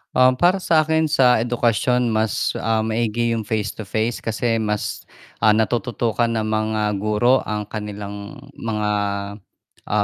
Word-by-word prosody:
Um, 130 0 +5
para 180 +8 +3
sa'kin, 160 -2 +2
sa 125 -5 +4
edukasyon 120 +1 +1
mas, 110 -2 0
ah, 110 0 0
maigi 115 +1 0
yung 110 -2 -2
face 105 -2 -1
to 110 - -9
face 110 +3 -1
kasi 115 +1 -1
mas, 105 -1 -3 0.3
ah, 110 -1 +4
natututukan 115 +1 0
ng 115 -1 -1
mga 110 0 0 0.2
guro 105 +5 +3
ang 105 -1 -2
kanilang 105 +1 -7 0.2
mga, 105 -5 -2 1.0
ah, 105 0 +2
110 Hz, 140 wpm, -21 LUFS, 105-120 Hz, 1.0 s, Um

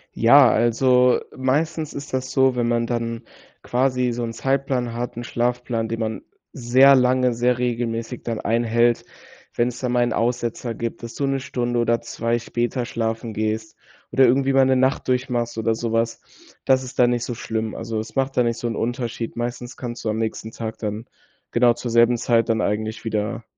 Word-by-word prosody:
Ja, 130 +2 +7
also, 125 +2 +3 0.2
meistens 155 +4 -1
ist 140 -1 -8
das 130 0 -2
so, 130 -1 +3
wenn 120 -1 0
man 120 0 +1
dann 115 0 -3 0.4
quasi 125 0 +1
so 120 0 -3
'n 115 -1 -4
Zeitplan 130 -1 -1
hat, 120 +1 -4
'n 120 - -5
Schlafplan, 120 -1 -1
den 115 - -3
man 110 -1 -3 0.3
sehr 130 +1 +5
lange, 125 -1 +3
sehr 120 +1 +1
regelmäßig 120 -1 -2
dann 115 -2 -3
einhält, 115 +1 +1 0.5
wenn's 120 +1 -1
dann 125 -2 -2
mal 120 0 +3
'n 120 -1 0
Aussetzer 120 0 -1
gibt, 115 +1 -5
dass 115 - -7
du 140 - -1
'ne 135 0 0
Stunde 120 -2 -2
oder 115 0 +1
2 115 0 -2
später 120 +1 -2
schlafen 115 -1 -3
gehst 110 +1 -3 0.4
oder 135 - +5
irgendwie 135 +2 +3
mal 135 0 +5
'ne 130 0 +3
Nacht 130 +1 +1
durchmachst 125 -2 -1
oder 110 0 +1
sowas, 115 0 -1 0.4
das 130 -1 +3
ist 130 0 -9
dann 120 -1 +5
nicht 120 -1 -1
so 120 - -4
schlimm, 110 -1 -3
also, 115 -1 -4
es 110 0 -7
macht 135 0 -1
dann 125 - +4
nicht 115 0 -1
so 120 - -3
'n 115 - -3
Unterschied. 120 -1 -3
Meistens 120 +1 -5
kannst 120 -1 -6
du 110 - -1
am 105 - -1
nächsten 110 0 -3
Tag 110 -1 -6
dann 105 +1 -4 0.5
genau 120 0 +4
zur 120 0 -5
selben 120 +1 +4
Zeit 115 -1 +1
dann 110 -1 +2
eigentlich 110 +2 -2
wieder 110 +2 -2
120 Hz, 190 wpm, -22 LUFS, 115-125 Hz, 0.5 s, Ja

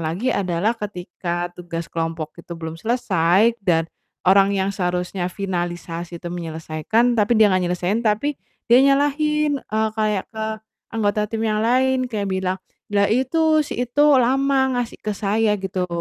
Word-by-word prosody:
lagi 170 +10 -1
adalah 185 +2 0
ketika 175 -3 -4
tugas 170 -2 -6
kelompok 165 -1 -3
itu 170 - -10
belum 160 0 -7
selesai 210 -2 +2
dan, 170 -4 +2 0.4
orang 195 +1 +6
yang 195 0 0
seharusnya 180 0 -2
finalisasi 175 -2 -4
itu 175 - -10
menyelesaikan, 165 +8 0
tapi 220 +1 +2
dia 220 - +7
nggak 185 -2 +2
nyelesain, 180 +5 -1
tapi 235 +7 +1 0.3
dia 245 +3 +6
nyalahin, 290 +1 +2
eee, 220 +1 0
kayak 215 -3 0
ke 220 - -3 0.5
anggota 210 -1 0
tim 225 0 -2
yang 215 0 0
lain, 255 +1 +2
kayak 205 -3 -2
bilang, 190 0 -1 0.3
"Lah 200 -1 +3
itu, 310 +6 +2
si 290 - -6
itu 265 +5 +1 0.2
lama 265 +1 +2
ngasih 245 -1 -3
ke 210 -1 -3
saya," 210 +1 +1
gitu. 190 -2 -3
205 Hz, 150 wpm, -21 LUFS, 175-235 Hz, 0.5 s, dia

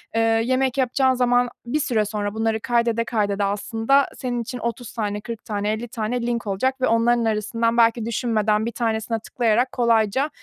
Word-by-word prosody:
eee, 225 - +3
yemek 245 +4 +1
yapacağın 260 0 +2
zaman 245 0 +2 0.2
bir 270 +6 -1
süre 220 -5 +1
sonra 205 -1 -3
bunları 225 0 0
kaydede 235 -1 +1
kaydede 205 -3 0
aslında 225 +7 +1
senin 245 -2 -2
için 245 +2 -6
30 235 0 -4
tane, 210 -2 -3
40 230 0 -8
tane, 205 -1 -2
50 235 +2 -4
tane 230 +1 -3
link 235 -2 -2
olacak 260 +7 -1
ve - - +3
onların 235 +1 +2
arasından 230 +2 0
belki 230 -1 +3
düşünmeden, 220 -2 0
1 - - -2
tanesine 225 -1 -1
tıklayarak 235 +2 0
kolayca 235 +3 +2
230 Hz, 175 wpm, -22 LUFS, 220-245 Hz, 0.2 s, eee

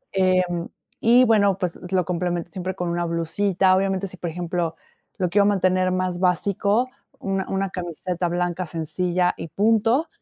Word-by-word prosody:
Em, 185 -2 +1 0.3
y, 240 +3 +5
bueno, 200 -4 +3
pues, 180 -3 -3
lo 185 -3 +2
complemento 175 -1 -2
siempre 185 +1 -4
con 180 -2 -3
una 175 0 -1
blusita. 185 +3 +1
Obviamente, 195 0 0
si, 185 - -8
por 175 - -4
ejemplo, 170 0 -2 0.4
lo 185 -3 0
quiero 200 +3 +3
mantener 185 -2 +2
más 185 -1 -1
básico, 200 +6 +1 0.3
una 195 -1 -2
una 195 0 -1
camiseta 175 0 -3
blanca 175 +1 -1
sencilla, 175 +3 0
y - - -6
punto. 225 - +2
185 Hz, 155 wpm, -23 LUFS, 175-195 Hz, 0.4 s, y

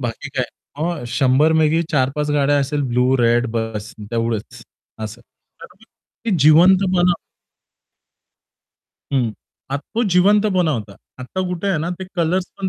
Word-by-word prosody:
बाकी 120 -3 -5
काय, - - +1 0.3
अ, 165 -3 -2
100 140 +3 +3
पैकी 160 +1 +3
4-5 145 +1 0
गाड्या 145 0 +2
असेल 145 +1 -1
ब्लू 125 +2 +2
रेड 120 +1 +3
बस 115 -1 -4 0.2
तेवढंच 115 -2 -3 0.4
असं. 110 +2 -6 0.4
तर - - -8 0.6
ते 230 - -1
जिवंतपणा 180 +4 +5 2.0
हं. 125 -4 +1 0.4
आता 140 +1 -2
तो 230 - +1
जिवंतपणा 190 -2 +3
होता. 105 -6 -5 0.2
आता 130 +9 -5
कुठे 180 +2 -3
आहे 190 -5 +1
ना, 160 +3 -2
ते 190 - -5
कलर्स 175 +2 +1
पण 195 -1 -1
150 Hz, 130 wpm, -20 LUFS, 125-180 Hz, 2.0 s, जिवंतपणा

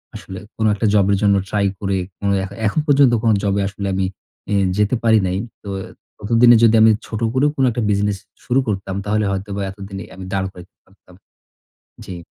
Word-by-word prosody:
আসলে 95 0 -8 0.2
কোন 110 - 0
একটা 110 - -2
জব 100 -2 +4
এর 100 - +2
জন্য 100 -1 +4
ট্রাই 100 -1 +1
করে, 100 -1 -1 0.2
কোন 100 - -3 0.2
এখ 95 - -5 0.2
এখন 130 - 0
পর্যন্ত 140 -4 +4
কোন 115 - +4
জব 100 -1 +1
আসলে 100 0 -5
আমি 95 0 0 0.5
ই - - +1 0.2
যেতে 105 +3 +2
পারি 110 -1 +5
নাই। 90 +1 -1 0.3
তো 100 - -7 0.5
ততদিনে 115 +3 +5
যদি 115 -1 +5
আমি 110 0 +7 0.2
ছোট 110 0 -5
করেও 140 +3 +2
কোন 135 - 0
একটা 120 +1 -3
বিজনেস 105 -1 0 0.3
শুরু 125 +2 +2
করতাম 95 -2 -3
তাহলে 105 0 0
হয়তোবা 100 +1 -4
এতদিনে 95 0 -8
আমি 95 0 -9
দাঁড় 95 -1 -1
করাইতে 90 0 -15
পারতাম। 95 -2 -22 0.9
জ্বী। 90 - -7
100 Hz, 190 wpm, -19 LUFS, 95-110 Hz, 0.9 s, আমি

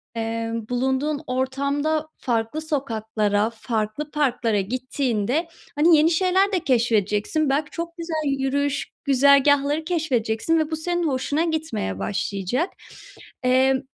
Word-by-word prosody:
eee, 225 0 -2 0.2
bulunduğun 265 +4 0
ortamda 280 +4 -1
farklı 235 +4 -1
sokaklara, 220 -7 -1
farklı 225 +5 -3
parklara 245 -7 +1
gittiğinde, 255 - -1 0.3
hani, 315 +2 +5
yeni 315 +3 +4
şeyler 375 +4 +2
de 370 - +1
keşfedeceksin. 235 - +1
Belki, 295 +2 0
çok 335 0 -6
güzel 320 -3 -2
yürüyüş 285 +1 -1
güzergâhları 280 +2 +4
keşfedeceksin 310 -4 0
ve 310 +1 -1
bu - - 0
senin 345 +1 -1
hoşuna 285 +4 0
gitmeye 315 - -2
başlayacak. 195 - -1 0.8
Eee, 260 +1 +3
275 Hz, 110 wpm, -23 LUFS, 230-310 Hz, 0.8 s, hani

